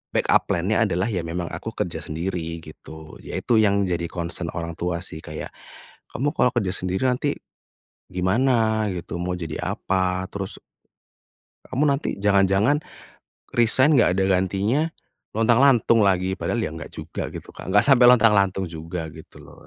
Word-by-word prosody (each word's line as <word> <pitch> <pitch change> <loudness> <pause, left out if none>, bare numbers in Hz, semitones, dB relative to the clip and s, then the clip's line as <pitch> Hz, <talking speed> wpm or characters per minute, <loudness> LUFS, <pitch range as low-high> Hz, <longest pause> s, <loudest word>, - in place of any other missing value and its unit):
backup - - +3
plan - - -1
nya - - +3
adalah 90 +5 0
ya 95 -6 -2
memang 85 +1 -4
aku - - -6
kerja - - -3
sendiri 85 0 -4
gitu 80 0 -12
yaitu 120 - -1
yang 100 -2 +3
jadi 85 -1 -1
concern 85 -1 -4
orang 85 -1 -5
tua 85 0 -2
sih 85 -3 -8
kayak, - - -7 0.6
"Kamu 145 +4 -1
kalau - - +4
kerja 100 -6 0
sendiri 95 +5 -2
nanti, 130 +3 0 0.7
gimana 110 +4 +1
gitu 85 -1 -6
mau 90 +1 -2
jadi 80 -3 -5 0.2
apa," 95 -1 -1
terus 95 -1 -5 1.1
"Kamu 135 +4 +1
nanti 140 -5 -1
jangan-jangan, 100 +7 +3 0.7
resign 130 +5 +4
enggak 90 -7 +4
ada 95 - +2
gantinya, 95 - +1 0.5
lontang-lantung 115 +1 +4
lagi?" 95 -1 +1
Padahal 120 - -1
ya 80 - -2
enggak 80 - -8
juga - - -5
gitu, - - -8
Kak, - - -9
enggak 105 +2 +5
sampai 130 -3 +6
lontang-lantung 100 -5 +4
juga 80 0 -6
gitu 80 +1 -14
loh. - - -16
95 Hz, 155 wpm, -23 LUFS, 85-115 Hz, 1.1 s, sampai